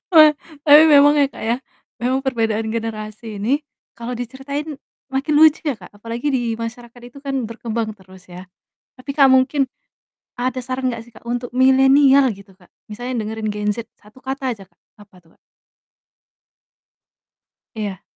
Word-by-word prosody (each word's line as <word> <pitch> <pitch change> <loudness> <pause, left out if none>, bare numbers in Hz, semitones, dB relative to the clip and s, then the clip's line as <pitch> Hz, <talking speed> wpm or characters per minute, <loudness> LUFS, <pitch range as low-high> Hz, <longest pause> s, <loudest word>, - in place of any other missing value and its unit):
Wah, 310 -1 +9 0.3
tapi 300 +1 +9
memang 290 0 +7
ya, 285 - +4
Kak, - - -12
ya, 230 +2 0 0.4
memang 255 +2 0
perbedaan 225 -4 0
generasi 220 -1 -5
ini 260 +8 +1 0.4
kalau 235 +1 -6
diceritain 275 +5 -5 0.4
makin 275 +3 0
lucu 315 0 +6
ya, 285 -5 -1
Kak, - - -14
apalagi 230 +6 -5
di 255 -2 +1
masyarakat 235 +1 -8
itu 245 - -14
kan 275 -3 -3
berkembang 230 -1 -4
terus 185 -1 -18
ya. 180 +1 -11 0.5
Tapi, 255 +3 -8
Kak, 275 -2 +6
mungkin 260 +1 +3 0.7
ada 255 +1 -1
saran 255 +1 -2
gak 230 -1 -6
sih, 240 - -19
Kak, - - -16
untuk 245 +1 -3
milenial 265 +1 +5
gitu, 195 -2 -14
Kak, 180 -2 -24 0.2
misalnya 245 +2 -4
dengerin 220 0 -4
gen 210 0 -2
Z 235 -1 -7
1 215 +5 -20
kata 265 0 -3
aja, 200 - -13
Kak, 190 - -39 0.2
apa 200 -2 -25
tuh, 165 -2 -27
Kak? - - -33 2.4
Iya. 205 -4 -5
245 Hz, 160 wpm, -20 LUFS, 220-270 Hz, 2.4 s, Wah